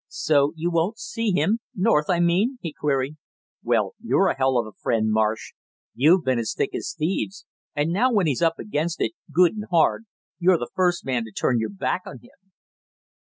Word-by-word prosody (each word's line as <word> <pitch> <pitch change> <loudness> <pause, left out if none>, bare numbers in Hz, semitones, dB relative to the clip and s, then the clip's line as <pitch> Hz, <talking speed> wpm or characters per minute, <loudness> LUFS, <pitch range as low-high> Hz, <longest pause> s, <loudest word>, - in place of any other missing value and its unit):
"So 145 -1 +1
you 170 +2 -2
won't 170 +6 0
see 230 -1 -3
him 200 +4 +1 0.2
North, 180 -6 +2
I 175 -2 +2
mean?" 185 +10 +2
he 165 -3 -5
queried. 140 0 -1 0.4
"Well, - - 0
you're 195 -4 +2
a - - -1
hell 130 -1 +2
of 120 - +1
a 110 - -9
friend, 110 -1 +1
Marsh. 110 0 0 0.4
You've 165 +8 +4
been 130 -2 +1
as 115 - -3
thick - - -1
as - - -4
thieves, 190 +5 -2 0.3
and 150 +3 0
now 250 +7 +2
when 205 -6 +2
he's 145 -3 0
up 165 -1 +2
against 165 -3 -3
it - - 0 0.2
good 175 0 +4
and 210 -1 -6
hard, 175 +6 +2 0.3
you're 180 0 +4
the 120 - -6
first 180 -1 +1
man 125 -3 -1
to 110 - -11
turn 120 +4 0
your 110 - -2
back 195 -2 -2
on 135 - -8
him!" 195 +10 -23
165 Hz, 200 wpm, -24 LUFS, 135-190 Hz, 0.4 s, You've